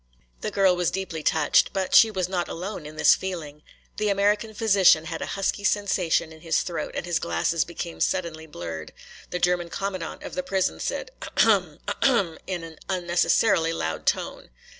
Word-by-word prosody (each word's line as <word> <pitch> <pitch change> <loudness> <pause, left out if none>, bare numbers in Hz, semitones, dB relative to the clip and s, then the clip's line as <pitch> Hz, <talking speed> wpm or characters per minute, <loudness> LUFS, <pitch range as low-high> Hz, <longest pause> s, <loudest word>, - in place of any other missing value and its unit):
The - - -3
girl 190 -2 +3
was 175 -1 +1
deeply 185 -4 -4
touched. 155 0 +3
But 190 -1 -2
she 225 - +8
was 185 -4 -2
not 180 -2 -2
alone 180 -2 -5
in 155 - -10
this - - +6
feeling. 160 -6 -5 0.4
The 210 0 0
American 205 +2 +1
physician 195 -7 +5
had - - -5
a - - -3
husky 200 +1 -1
sensation 190 -6 +1
in 160 - -15
his 165 -1 +1
throat 165 -4 -4
and - - -3
his 175 -2 0
glasses 85 - 0
became 170 0 -7
suddenly 165 -4 -1
blurred. 85 - -7 0.4
The - - -2
German 175 -1 +1
commandant 185 -2 -4
of - - -7
the 180 - -1
prison 185 +1 -1
said - - -3
"A - - -6
hum, 185 -9 +3
a - - 0
hum," 200 -11 +2
in 180 -3 -3
an 160 -2 -10
unnecessarily 175 -1 +2
loud 80 - -4
tone. - - -1
175 Hz, 180 wpm, -25 LUFS, 160-195 Hz, 0.4 s, she